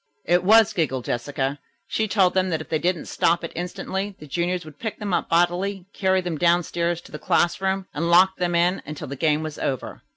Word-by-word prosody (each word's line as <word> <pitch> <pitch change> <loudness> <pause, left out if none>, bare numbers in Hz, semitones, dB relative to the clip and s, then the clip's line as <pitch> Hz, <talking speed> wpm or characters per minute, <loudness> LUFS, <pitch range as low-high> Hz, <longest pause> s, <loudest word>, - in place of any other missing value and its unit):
"It 175 +1 +3
was," 220 +2 +6
giggled 135 -7 -1
Jessica. 135 +3 -2 0.3
"She 220 +2 -1
told 195 -3 +3
them 185 0 +1
that 160 -3 -1
if 155 - -9
they 155 - 0
didn't 175 0 -1
stop 170 +1 +1
it 165 - -5
instantly, 190 +3 -4
the 150 - -11
juniors 175 +3 -2
would 155 -2 -13
pick 220 -2 -4
them 205 -3 -4
up - - 0
bodily, 175 +3 +1
carry 190 -1 +1
them 175 -4 -4
downstairs 170 0 +1
to - - -16
the 150 - -7
classroom 190 +4 +1
and 170 +3 -1
lock 185 +2 +5
them 175 -1 0
in 175 +2 +2
until 150 0 -7
the 140 - -5
game 155 +2 +1
was 155 -1 -6
over." 130 -2 -3
175 Hz, 215 wpm, -23 LUFS, 155-190 Hz, 0.3 s, was